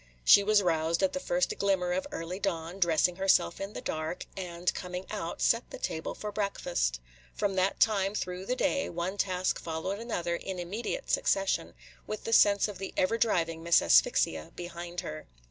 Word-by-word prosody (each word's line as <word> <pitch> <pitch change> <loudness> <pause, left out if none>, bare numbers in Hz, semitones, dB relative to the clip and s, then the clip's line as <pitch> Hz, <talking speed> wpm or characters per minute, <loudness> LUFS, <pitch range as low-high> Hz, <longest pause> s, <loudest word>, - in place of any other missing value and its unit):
She 200 - +8
was 210 0 +4
roused 165 +1 +1
at 190 - +2
the 275 - -2
first - - 0
glimmer 190 -3 +1
of 185 +1 -1
early 170 +3 -5
dawn, 175 -2 -3
dressing 175 0 +2
herself 190 - +2
in 195 +1 -5
the - - -6
dark, 155 +3 -4
and, 175 -2 -2
coming 180 0 -5
out, 185 -6 -4
set 230 +1 +2
the - - -8
table 160 - -4
for 210 - -5
breakfast. 60 - -1 0.4
From 200 -1 0
that 190 +1 +1
time 200 -2 +2
through 180 -1 -4
the 250 - 0
day, 280 +1 0
one 175 +3 -3
task 185 -2 0
followed 170 +5 -4
another 175 -7 -2
in 190 +2 -5
immediate 210 - -4
succession, 195 - +1 0.3
with 215 - -5
the 225 - -2
sense 200 -2 +5
of 205 -3 -8
the 195 - -6
ever 225 +5 +2
driving 165 -7 +1
Miss 170 0 +5
Asphyxia 75 +6 +3
behind 175 0 -6
her. 75 0 -7
185 Hz, 180 wpm, -29 LUFS, 170-200 Hz, 0.4 s, She